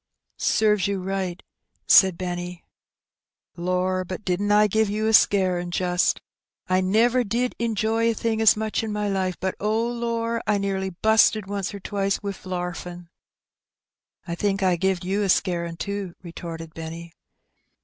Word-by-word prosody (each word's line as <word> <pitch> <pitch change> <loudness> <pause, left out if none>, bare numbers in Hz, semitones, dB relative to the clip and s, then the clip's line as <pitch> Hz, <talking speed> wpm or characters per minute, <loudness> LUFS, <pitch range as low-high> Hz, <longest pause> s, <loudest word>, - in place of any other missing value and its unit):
'' - - -63
" - - -50 0.2
Serves 210 -3 +3
you 200 -1 -1
right/' 190 -1 -3 0.4
said 190 -3 +6
Benny. 175 -1 -5 0.9
''Lor, 185 +1 0
but 185 +3 -7
didn't 195 +3 0
I 210 0 +6
give 220 +1 +1
you 215 +2 -1
a 220 - +2
scarin', 185 -4 +3
just! 180 0 +1 0.5
I 185 0 +2
never 230 +6 +3
did 240 +3 -1
injoy 225 0 +1
a 230 - 0
thing 225 0 -1
as 220 -1 +6
much 220 0 -1
in 220 -1 -4
my 210 0 -1
life; 190 -2 -1
but^ 190 0 -1
oh^ 225 +3 0
lorl 230 0 -1
I 210 -1 +3
nearly 195 -1 -2
busted 220 +2 +3
once 200 -1 -3
or 200 - -7
twice 200 0 -1
wi' 200 -1 -2
larfin'." 175 -1 -5 1.2
"I 170 - -3
think 195 +2 -1
I 185 -2 +3
gived 185 0 -1
you 195 +3 0
a 200 - 0
scarin' 170 -2 0
too/' 200 -2 -4
retorted 165 -2 -8
Benny. 165 +1 -8
195 Hz, 160 wpm, -24 LUFS, 180-215 Hz, 1.2 s, said